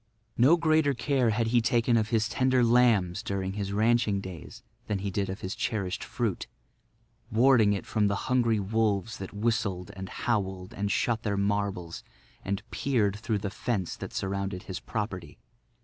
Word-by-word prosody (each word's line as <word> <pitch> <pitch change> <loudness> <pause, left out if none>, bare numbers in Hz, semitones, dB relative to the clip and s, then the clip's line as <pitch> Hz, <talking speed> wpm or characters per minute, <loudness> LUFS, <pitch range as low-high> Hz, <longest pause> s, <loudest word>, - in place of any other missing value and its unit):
No 135 +8 +5
greater 155 -4 +3
care 125 0 +1
had 110 +2 +1
he 120 - +5
taken 115 +1 +2
of 110 -1 +1
his 115 -2 +2
tender 130 +1 +2
lambs 115 -7 +3
during 95 -1 -3
his 100 -1 -3
ranching 110 -1 +2
days 95 -5 -9 0.2
than 105 - 0
he 100 +1 -3
did 100 +1 -1
of 95 - -5
his 95 - -3
cherished 100 -4 -2
fruit, 120 -7 -2 0.8
warding 115 -3 +5
it 100 - -4
from 105 -2 +1
the 100 - 0
hungry 120 -4 +2
wolves 110 +1 0
that 95 - -6
whistled 105 -4 -1
and 95 0 -7
howled 95 -5 -2
and 100 0 -2
shot 115 +1 +1
their 100 -3 -1
marbles 100 -4 -1 0.4
and 100 +2 -2
peered 105 -7 +1
through 110 0 -1
the 100 -1 -4
fence 100 -8 -2
that - - -7
surrounded 95 -1 -3
his 95 - -6
property. 100 -5 -5
105 Hz, 165 wpm, -28 LUFS, 95-120 Hz, 0.8 s, No